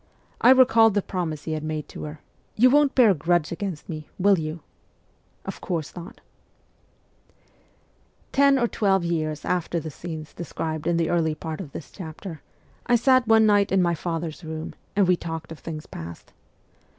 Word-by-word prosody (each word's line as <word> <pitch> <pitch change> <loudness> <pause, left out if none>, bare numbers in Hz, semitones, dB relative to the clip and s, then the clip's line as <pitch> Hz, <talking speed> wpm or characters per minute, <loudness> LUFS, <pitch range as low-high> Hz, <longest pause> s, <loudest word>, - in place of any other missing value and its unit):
I - - +6
recalled 250 -5 +6
the 205 - +2
promise 160 -5 -3
he 160 - -4
had 155 -1 -3
made 155 -1 -4
to - - -7
her 150 0 -8 0.3
you 250 +3 +5
won't 290 0 +4
bear 240 -5 +6
a - - +4
grudge 170 0 +1
against 175 -2 -5
me, 155 -2 -7
will 195 -1 +4
you? 155 +1 -5 0.3
' - - -39
' - - -39
Of - - -6
course 165 -5 -3
not! 175 -1 -10 0.9
' - - -37
Ten 280 0 +5
or 240 -2 +2
twelve 195 -5 +1
years 155 -3 -2
after 175 -1 -1
the 160 -1 -6
scenes 155 0 -7
described 160 -2 -4
in 170 -1 +2
the 165 -1 +1
early 160 -3 +1
part 160 +2 -5
of 155 -7 -9
this 145 - -9
chapter, 165 -2 -8 0.5
I 245 - +4
sat 255 +1 +4
one 220 -1 +6
night 205 -1 +3
in 195 - +3
my 170 -1 +2
father's 165 0 -4
room, 160 0 -6 0.2
and 200 -2 +4
we 180 - +5
talked 165 -2 -6
of 160 - -8
things 155 -2 -7
past. 85 +1 -10
170 Hz, 185 wpm, -24 LUFS, 155-205 Hz, 0.9 s, I